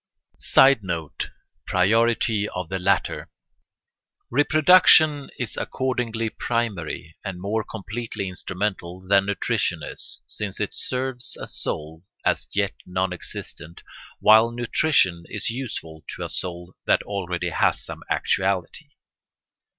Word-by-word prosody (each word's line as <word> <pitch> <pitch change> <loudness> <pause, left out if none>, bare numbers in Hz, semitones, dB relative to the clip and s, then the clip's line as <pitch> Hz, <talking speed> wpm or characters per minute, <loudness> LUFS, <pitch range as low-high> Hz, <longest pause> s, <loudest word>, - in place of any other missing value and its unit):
[Sidenote: 95 - +3 0.4
Priority 110 +2 +2
of 90 -2 -5
the 95 - -2
latter] 95 +1 0 1.0
Reproduction 155 +1 +6
is 125 - -3
accordingly 120 -3 -1
primary 100 -9 -3
and 95 -3 -5
more 105 +4 -1
completely 110 0 -5
instrumental 90 -1 -3
than 100 +1 +3
nutrition 100 - 0
is, - - -6
since 100 -2 -5
it 105 - -2
serves 125 -1 -3
a - - -5
soul 80 +2 -2 0.2
as - - +1
yet 100 -1 +1
non 90 0 -1
existent, 85 -1 -5 0.4
while 110 +2 +7
nutrition 120 - +2
is - - -2
useful 105 -11 -6
to - - -6
a - - -6
soul 90 0 -4
that - - +3
already 90 -3 -3
has - - +1
some - - -8
actuality. 95 -3 0
100 Hz, 110 wpm, -24 LUFS, 90-120 Hz, 1.0 s, while